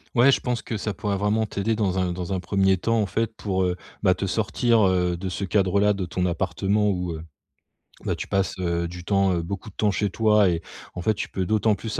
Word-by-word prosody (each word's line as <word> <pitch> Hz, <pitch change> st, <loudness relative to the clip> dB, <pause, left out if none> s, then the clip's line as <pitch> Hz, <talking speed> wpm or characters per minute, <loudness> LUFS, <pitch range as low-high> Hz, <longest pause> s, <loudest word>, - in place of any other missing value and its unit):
Ouais 125 Hz, +3 st, +6 dB
je -, -, +2 dB
pense 125 Hz, -2 st, -2 dB
que 110 Hz, -, -4 dB
ça 105 Hz, 0 st, -3 dB
pourrait 100 Hz, -2 st, -2 dB
vraiment 105 Hz, +3 st, +1 dB
t'aider 105 Hz, +2 st, -1 dB
dans 95 Hz, -4 st, 0 dB
un 90 Hz, -1 st, 0 dB
dans 90 Hz, +1 st, -5 dB
un 95 Hz, -, -1 dB
1er 95 Hz, +1 st, +2 dB
temps 115 Hz, +5 st, +1 dB
en -, -, +1 dB
fait 115 Hz, +2 st, -2 dB
pour, 95 Hz, -2 st, -1 dB
heu, 90 Hz, -1 st, 0 dB, 0.3 s
bah 95 Hz, -2 st, +5 dB
te 100 Hz, -, -3 dB
sortir, 110 Hz, +2 st, +2 dB
heu, 90 Hz, -2 st, +1 dB
de 95 Hz, +2 st, -5 dB
ce 95 Hz, -, -4 dB
cadre-là 100 Hz, +1 st, +2 dB
de 100 Hz, -2 st, -3 dB
ton 90 Hz, +1 st, -2 dB
appartement 100 Hz, +4 st, 0 dB
où, 90 Hz, -3 st, -1 dB
heu, 80 Hz, 0 st, -7 dB, 0.8 s
bah, -, -, 0 dB
tu -, -, -6 dB
passes, 95 Hz, -1 st, 0 dB
heu, 85 Hz, -1 st, -1 dB
du 90 Hz, +1 st, -9 dB
temps, 95 Hz, -1 st, +2 dB
beaucoup 95 Hz, +6 st, -5 dB
de 95 Hz, -, -19 dB
temps 105 Hz, -1 st, +2 dB
chez 100 Hz, +2 st, 0 dB
toi. 105 Hz, 0 st, +4 dB
Et 85 Hz, -1 st, -1 dB, 0.3 s
en 90 Hz, -, -5 dB
fait, 110 Hz, +5 st, +1 dB
tu -, -, -4 dB
peux 95 Hz, -, -2 dB
d'autant 110 Hz, +1 st, +2 dB
plus 110 Hz, +2 st, -5 dB
100 Hz, 240 wpm, -24 LUFS, 90-105 Hz, 0.8 s, Ouais